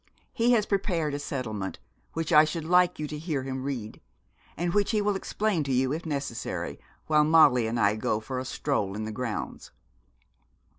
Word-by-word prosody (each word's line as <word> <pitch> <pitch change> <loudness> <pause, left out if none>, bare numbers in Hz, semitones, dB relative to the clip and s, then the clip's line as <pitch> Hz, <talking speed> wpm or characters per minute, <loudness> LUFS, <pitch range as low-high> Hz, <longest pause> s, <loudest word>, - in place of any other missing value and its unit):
He 240 +1 +3
has 215 -3 +3
prepared 175 -8 0
a 145 - -2
settlement, 110 -9 -4 0.4
which 165 +1 -2
I 150 0 +9
should 155 +1 -3
like 180 +1 +4
you 155 - -3
to 150 0 -6
hear 150 -4 -2
him 130 0 -4
read, 130 -6 -5 0.6
and 175 +1 -1
which 205 -1 +2
he 220 - +2
will 205 -1 +1
explain 195 -3 -1
to 135 - -2
you, 130 +1 +2
if 165 +2 -4
necessary, 140 -6 -4 0.3
while 150 -1 +4
Molly 150 -7 +5
and 115 +1 -1
I 105 -1 +3
go 110 0 0
for 125 +4 -4
a 130 - -5
stroll 115 -8 -1
in 110 +1 -3
the 110 - -4
grounds.' 115 0 -4
150 Hz, 190 wpm, -27 LUFS, 125-170 Hz, 0.6 s, I